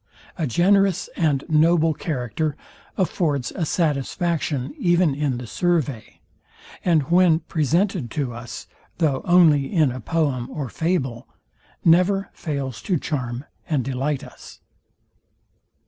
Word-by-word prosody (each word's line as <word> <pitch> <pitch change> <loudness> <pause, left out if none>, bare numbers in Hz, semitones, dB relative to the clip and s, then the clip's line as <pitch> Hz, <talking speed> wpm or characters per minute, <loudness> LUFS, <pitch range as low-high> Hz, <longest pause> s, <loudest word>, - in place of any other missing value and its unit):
A 160 -4 -2
generous 195 - +2
and 145 -5 +1
noble 160 0 +3
character 145 0 -3 0.4
affords 150 -9 0
a 165 -4 -1
satisfaction 150 - -1
even 175 - +3
in 140 -3 -1
the 125 - -6
survey; 150 -5 -1 0.6
and 165 -5 +3
when 175 -2 +5
presented 165 - 0
to 130 0 -3
us, 120 0 -8 0.3
though 150 -6 +1
only 160 -6 +4
in 155 -9 +3
a 130 - -6
poem 135 -3 -1
or 140 -5 -5
fable, 135 -8 -2 0.6
never 185 +4 +3
fails 140 -7 -4
to 185 - 0
charm 130 -3 -4 0.2
and 145 -6 0
delight 135 +2 -2
us. 125 - -13
155 Hz, 115 wpm, -23 LUFS, 135-175 Hz, 0.6 s, when